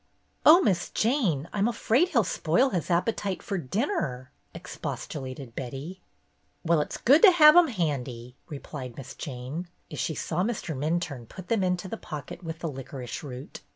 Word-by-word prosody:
"Oh, 335 +4 +9
Miss 180 - +1
Jane, 215 - +1
I'm 205 +1 +2
afraid 240 +7 +2
he'll 245 -10 +3
spoil 185 - +2
his 180 -4 -2
appetite 190 +2 0
for 195 -3 -2
dinner," 150 - -2 0.2
expostulated 140 -6 -6
Betty. 140 +8 -6 0.6
"Well, 165 -2 +3
it's - - -4
good 280 +6 +5
to 420 - +10
have 305 -3 +8
'em 350 -1 +7
handy," 130 - -3
re 145 - -5
plied 130 -4 -8
Miss 135 -1 -8
Jane, 140 +5 -6 0.2
as - - -6
she 160 - -1
saw 165 +4 -2
Minturne 160 - -2
put 185 -2 -10
them 225 -4 +2
into 180 0 0
the 225 - -5
pocket 155 +2 -8
with 160 -1 -5
the 165 - -2
licorice 135 -1 -6
root. 130 -3 -8
170 Hz, 160 wpm, -27 LUFS, 135-210 Hz, 0.6 s, to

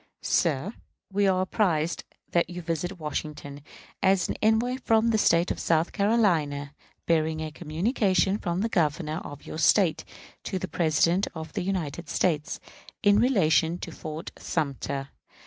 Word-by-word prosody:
Sir: 165 - +1 0.4
We 200 0 +3
are 185 -1 +2
apprised 175 -5 0 0.3
that 170 -1 +2
you 175 0 -6
visit 175 +3 -3
Washington, 150 -2 -5 0.4
as 190 -1 +3
an - - -1
envoy 225 +4 +2
from 225 +1 +3
the 220 - +2
State 170 -2 +3
of - - -3
South 165 0 +1
Carolina, 165 -10 +1 0.3
bearing 160 -1 +1
a 155 0 -4
communication 190 - +1
from 175 0 -2
the 225 - +1
Governor 155 -3 0
of 145 0 -10
your 155 - -6
State 180 -1 +3 0.4
to 190 - -2
the 185 - -4
President 170 +3 +2
of 160 -1 -7
the 200 - -2
United 170 -4 -3
States, 155 -4 0 0.4
in 205 0 +5
relation 175 - +3
to - - -7
Fort 155 0 -7
Sumter. 140 -1 -3
170 Hz, 145 wpm, -27 LUFS, 155-195 Hz, 0.4 s, in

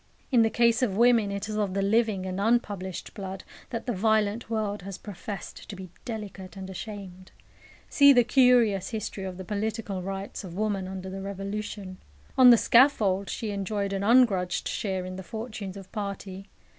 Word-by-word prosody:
In 245 -3 +5
the 225 - +4
case 235 +2 +3
of 205 -6 0
women, 235 -3 +4
it 200 0 -4
is 215 - -4
of 195 -3 -1
the 195 - +1
living 210 -2 +1
and 185 +1 -3
unpublished 205 -5 -1
blood 190 -2 -6 0.3
that 230 - -4
the 245 - -1
violent 220 +2 +1
world 210 -3 -2
has 195 0 -7
professed 200 -1 -8
to 205 - -6
be 185 -2 -9
delicate 200 -5 -7
and 190 0 -7
ashamed. 190 -2 -8 0.6
See 280 -1 +7
the 245 -3 +6
curious 235 -6 +4
history 210 -3 -4
of 185 -1 -6
the 185 - -7
political 210 -2 -3
rights 195 +2 -5
of 175 -3 -8
woman 205 -3 -1
under 190 0 -6
the 195 0 -6
Revolution. 200 0 -5 0.4
On 255 -1 +8
the 240 - +9
scaffold 215 -7 +4
she 220 -2 -3
enjoyed 200 0 -2
an 195 - -2
ungrudged 200 -5 +3
share 190 -3 -2
in 185 0 -6
the - - -5
fortunes 215 -1 -6
of 195 -1 -11
party. 200 -2 -6
200 Hz, 180 wpm, -27 LUFS, 190-220 Hz, 0.6 s, the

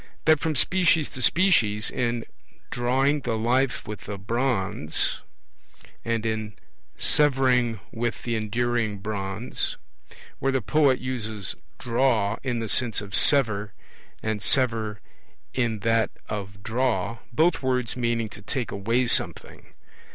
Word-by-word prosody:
That 155 -2 +5
from 160 0 -1
species 170 0 +3
to 130 - -7
species 120 - +3
in 120 -1 -1 0.5
'Drawing 135 +4 +1
the 120 -4 -2
life 125 +3 0
with 105 -2 -7
the 100 -1 -4
bronze', 105 - -1 0.8
and 115 -1 -1
in 110 -1 -3 0.4
'Severing 130 -6 +3
with 120 0 -3
the 120 -1 -1
enduring 115 0 -1
bronze'; 100 +3 -3 0.6
where 135 - +1
the 135 - +1
poet 140 +1 +3
uses 110 -6 -3 0.2
'draw' 115 -4 +1
in 125 -3 -2
the 115 -1 -3
sense 120 +1 +2
of 100 -1 -9
'sever' 110 -8 +4 0.5
and 110 -2 -2
'sever' 115 -5 +1 0.5
in 115 -4 -1
that 115 0 +2 0.2
of 100 -1 -6
'draw', 115 -2 -1
both 160 +7 +2
words 125 -3 -1
meaning 115 -2 0
to 100 - -11
'take 120 +3 -3
away' 115 +6 0
something. 120 - 0
115 Hz, 125 wpm, -25 LUFS, 105-130 Hz, 0.8 s, That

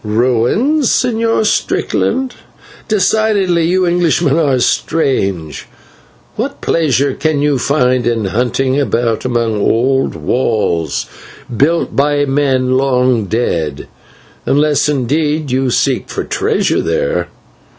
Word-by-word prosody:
"Ruins, 125 - +1
Señor 230 -2 +1
Strickland! 260 +4 -1 0.5
Decidedly 200 -4 +1
you 185 +1 +1
Englishmen 170 -4 +1
are 145 -5 +2
strange. 100 - -1 0.7
What - - -4
pleasure 140 -4 +1
can 155 +1 -1
you 145 -3 +1
find 125 -2 +1
in 115 -3 0
hunting 125 +6 0
about 120 -5 -1
among 120 -3 0
old 125 +5 +1
walls, 85 -1 -1 0.5
built 160 +8 +1
by 145 +1 +2
men 135 -2 0
long 125 -4 +1
dead, 85 - -2 0.6
unless 150 +1 +2
indeed 150 +2 -1
you 130 0 0
seek - - 0
for - - -3
treasure - - 0
there. 85 +4 -1
135 Hz, 105 wpm, -14 LUFS, 120-160 Hz, 0.7 s, are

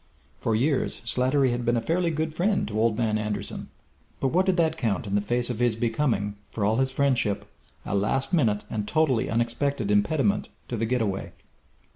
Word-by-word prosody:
For 110 - 0
years 135 +4 +1
Slattery 130 +2 +2
had 120 0 -2
been 120 0 +2
a - - 0
fairly 170 +6 +1
good 160 0 -2
friend 195 +5 +1
to 105 0 -2
Old 110 -1 +2
Man 110 -2 +1
Anderson, 105 -1 -4 0.5
but 135 - +1
what 185 +7 +2
did 190 -1 +2
that 160 -2 +2
count 115 - -1
in 100 - -4
the 105 - +3
face 120 +4 0
of 120 - -5
his 120 -2 +2
becoming, 115 -3 0
for 105 - -2
all 110 +2 +2
his 130 0 +1
friendship, 130 -7 +1 0.4
a - - -3
last 105 - 0
minute 110 -11 +2
and 105 -2 -3
totally 150 -6 +2
unexpected 120 0 0
impediment 105 +1 +2 0.2
to 120 - -2
the 115 0 -1
get 125 0 +1
away? 95 -2 -3
120 Hz, 195 wpm, -26 LUFS, 105-140 Hz, 0.5 s, the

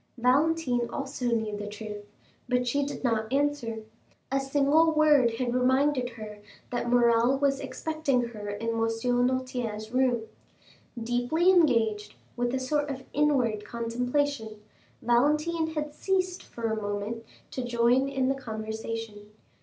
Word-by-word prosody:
Valentine 255 -1 +2
also 275 -2 -4
knew 220 -3 0
the 205 0 -5
truth, 210 0 -7 0.5
but 250 -1 +2
she 285 +4 +1
did 280 - -5
not 225 -2 0
answer. 275 -6 0 0.5
A 270 - +2
single 285 +4 +3
word 295 -7 +4
had 240 0 -1
reminded 260 +1 +2
her 210 -1 -8 0.3
that 240 -1 -2
Morrel 240 +1 +4
was 275 -1 +1
expecting 280 -8 -1
her 210 -3 -7
in 205 +3 -3
M. 230 - -1
Noirtier's 245 -1 -1
room. 250 -2 +2 0.8
Deeply 245 +10 +2
engaged 230 - +2 0.2
with 245 0 0
a - - 0
sort 290 +3 -1
of 270 -1 -5
inward 255 -8 +2
contemplation, 235 +1 -2 0.4
Valentine 300 +7 +2
had 300 -1 -3
ceased 370 +1 -1
for 235 - -11
a 220 0 -2
moment 205 +3 -3 0.3
to 255 - -3
join 240 +3 +2
in 265 -2 0
the 270 - +2
conversation. 220 -3 -6
245 Hz, 135 wpm, -28 LUFS, 225-280 Hz, 0.8 s, word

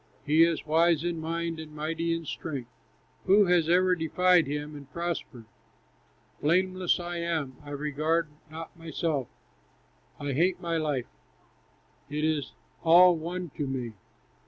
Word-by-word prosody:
He 155 +1 +4
is 165 -1 +3
wise 165 0 +3
in 175 -1 -2
mind 165 0 -3
and 155 -1 -9
mighty 165 +2 -2
in 165 0 -2
strength, 135 -6 -5 0.6
Who 200 +2 +6
has 175 -3 +3
ever 185 +1 +4
defied 180 0 +3
him 150 +1 -4
and 145 -1 -11
prospered, 170 -8 -4 1.0
Blameless 185 +3 +2
I 175 0 -4
am! 160 -6 -2
I 145 - -10
regard 150 +3 -1 0.2
not 160 +2 -8
myself; 160 -5 -2 0.9
I 145 -1 -2
hate 175 +6 +2
my 170 -2 -1
life; 150 -6 -1 1.0
it 150 +1 -2
is 155 -2 0 0.3
all 175 +2 +7
one 175 +1 -5
to 145 - -1
me. 125 -4 -3
165 Hz, 135 wpm, -28 LUFS, 150-170 Hz, 1.0 s, all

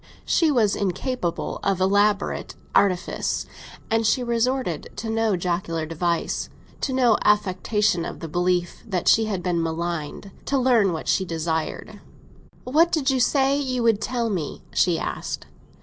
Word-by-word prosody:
She 330 - +3
was 230 -8 +3
incapable 195 0 -2
of 195 -2 +1
elaborate 200 +2 +1 0.2
artifice, 185 -3 +1 0.5
and 225 0 +2
she 225 +3 +2
resorted 240 - -1
to 220 +2 -4
no 225 -2 +1
jocular 170 -2 -2
device—to 170 - -3
no 250 -4 +3
affectation 205 -2 +2
of - - -6
the 165 - -6
belief 175 +2 0
that 185 -5 -2
she 225 - +5
had 195 -5 -3
been 175 -2 0
maligned—to 170 - -3
learn 240 -7 +3
what 160 -2 -5
she 190 - +2
desired. 160 -2 -3 0.6
"What 320 +7 +3
did 290 -4 +2
you 260 - +1
say 275 +2 +3
you 255 -3 -1
would 225 -3 +3
tell 235 -2 -1
me?" 170 -7 -4
she 175 -3 +3
asked. - - -4
200 Hz, 140 wpm, -24 LUFS, 175-240 Hz, 0.6 s, she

